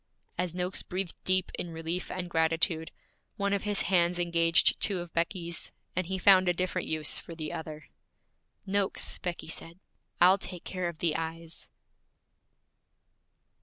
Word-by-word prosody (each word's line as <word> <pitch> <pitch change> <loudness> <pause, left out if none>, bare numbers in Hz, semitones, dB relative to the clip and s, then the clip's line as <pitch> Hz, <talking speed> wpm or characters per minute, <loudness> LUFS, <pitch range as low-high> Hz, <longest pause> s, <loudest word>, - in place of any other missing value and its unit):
As 180 -1 -2
Noakes 180 +1 -1
breathed 185 -1 -3
deep 185 0 +1
in 175 - -3
relief 165 +2 -4
and 180 -1 -4
gratitude, 160 0 +1 0.5
one 200 0 +1
of 200 - -1
his 205 -1 +3
hands 175 -2 +3
engaged 170 -2 +4
two 200 -3 +1
of 175 -1 -6
Becky's, 170 0 -2 0.2
and 185 -1 -1
he 190 +1 -2
found 185 -1 +6
a 175 - +1
different 185 +1 -1
use 155 -1 +1
for 165 - -10
the 155 -2 -5
other. 155 -2 -7 0.8
'Noakes,' 200 0 +1
Becky 175 -3 -4
said, 165 +1 -5 0.4
'I'll 185 +3 +7
take 180 -2 -6
care 185 -2 -2
of 170 - -9
the 160 -1 0
eyes.' 165 0 -5
175 Hz, 150 wpm, -29 LUFS, 165-185 Hz, 0.8 s, I'll